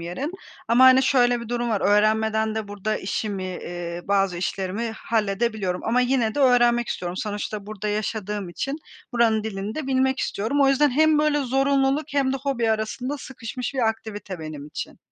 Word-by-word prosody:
yerin. 220 Hz, -, -4 dB, 0.4 s
Ama, 240 Hz, +3 st, +6 dB
hani, 260 Hz, +1 st, +7 dB
şöyle 245 Hz, -3 st, +3 dB
bir 235 Hz, -, -8 dB
durum 240 Hz, 0 st, -1 dB
var, 210 Hz, -, 0 dB
öğrenmeden 220 Hz, +1 st, +2 dB
de 220 Hz, -2 st, -4 dB
burada 205 Hz, +1 st, -2 dB
işimi, 200 Hz, 0 st, -3 dB
eee, 175 Hz, -1 st, -5 dB
bazı 195 Hz, -3 st, +2 dB
işlerimi 195 Hz, +5 st, -2 dB
halledebiliyorum 210 Hz, -3 st, -1 dB
ama 235 Hz, +3 st, +2 dB
yine 245 Hz, -3 st, +1 dB
de 290 Hz, -, -1 dB
öğrenmek 240 Hz, -2 st, +4 dB
istiyorum. 180 Hz, 0 st, -4 dB
Sonuçta 205 Hz, 0 st, -4 dB
burada 210 Hz, 0 st, -5 dB
yaşadığım 210 Hz, -2 st, -3 dB
için 275 Hz, -, -3 dB, 0.4 s
buranın 225 Hz, -2 st, +2 dB
dilini 205 Hz, 0 st, -4 dB
de 310 Hz, -3 st, -4 dB
bilmek 265 Hz, 0 st, +1 dB
istiyorum. 235 Hz, +8 st, -1 dB
O 275 Hz, -, +5 dB
yüzden 275 Hz, +1 st, +4 dB
hem 310 Hz, +3 st, +4 dB
böyle 300 Hz, -1 st, +2 dB
zorunluluk 270 Hz, +2 st, +2 dB
hem 270 Hz, -2 st, +2 dB
de -, -, 0 dB
hobi 260 Hz, -5 st, -1 dB
arasında 245 Hz, +6 st, -2 dB
sıkışmış 255 Hz, 0 st, -6 dB
bir 240 Hz, -4 st, +2 dB
aktivite 205 Hz, -4 st, -5 dB
benim 155 Hz, -2 st, -7 dB
için. -, -, -7 dB
220 Hz, 170 wpm, -24 LUFS, 205-260 Hz, 0.4 s, hani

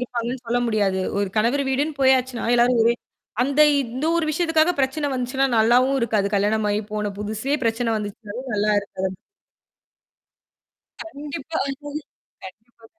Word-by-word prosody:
இருப்பாங்கன்னு 245 Hz, 0 st, -3 dB
சொல்ல 240 Hz, +1 st, +1 dB
முடியாது. 200 Hz, -4 st, +1 dB, 0.2 s
ஒரு 200 Hz, -1 st, 0 dB
கணவர் 245 Hz, +6 st, +2 dB
வீடுன்னு 285 Hz, +3 st, -1 dB
போயாச்சுனா, 260 Hz, -2 st, +2 dB
எல்லாரும் 240 Hz, 0 st, +4 dB
ஒரே 235 Hz, -, +4 dB, 0.5 s
அந்த 280 Hz, +3 st, +1 dB, 0.2 s
இந்த 255 Hz, +2 st, -4 dB
ஒரு 335 Hz, -, +1 dB
விஷயத்துக்காக 325 Hz, +1 st, +2 dB
பிரச்சனை 275 Hz, +3 st, 0 dB
வந்துச்சுன்னா, 255 Hz, +2 st, 0 dB
நல்லாவும் 250 Hz, +5 st, +4 dB
இருக்காது. 215 Hz, -4 st, +1 dB
கல்யாணம் 210 Hz, +2 st, +1 dB
ஆயி 205 Hz, -, 0 dB
போன 210 Hz, -1 st, -2 dB
புதுசே 220 Hz, +7 st, -1 dB
பிரச்சனை 230 Hz, +1 st, 0 dB
வந்துச்சுனாலும் 210 Hz, +4 st, -7 dB
நல்லா 210 Hz, +1 st, +1 dB
இருக்காது. 190 Hz, -1 st, -5 dB, 1.9 s
கண்டிப்பா. 295 Hz, 0 st, -6 dB, 0.8 s
கண்டிப்பா. 220 Hz, +4 st, -14 dB
240 Hz, 125 wpm, -22 LUFS, 215-270 Hz, 1.9 s, எல்லாரும்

